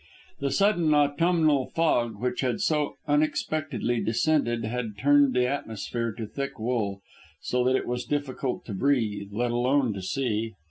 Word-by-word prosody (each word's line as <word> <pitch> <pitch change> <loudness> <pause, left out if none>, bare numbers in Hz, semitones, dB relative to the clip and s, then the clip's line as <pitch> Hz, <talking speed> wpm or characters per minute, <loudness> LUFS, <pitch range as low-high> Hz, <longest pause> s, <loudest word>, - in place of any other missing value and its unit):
The 140 - -1
sudden 175 -4 +3
autumnal 150 -1 +3
fog 120 -10 0
which 125 0 -1
had 130 +3 0
so 150 -6 0
unexpectedly 145 -5 0
descended 120 +1 +1
had 110 -2 -4
turned 140 +1 +4
the 125 0 +3
atmosphere 115 -3 -3
to 110 +1 -5
thick 140 +6 -5
wool, 110 -4 -2 0.4
so 125 0 0
that 130 +1 +3
it - - -1
was 125 0 -3
difficult 140 -2 -3
to 105 - -6
breathe, 105 -4 0
let 120 +3 -1
alone 125 0 +2
to 100 - -6
see. 110 +1 -2
125 Hz, 150 wpm, -26 LUFS, 115-145 Hz, 0.4 s, turned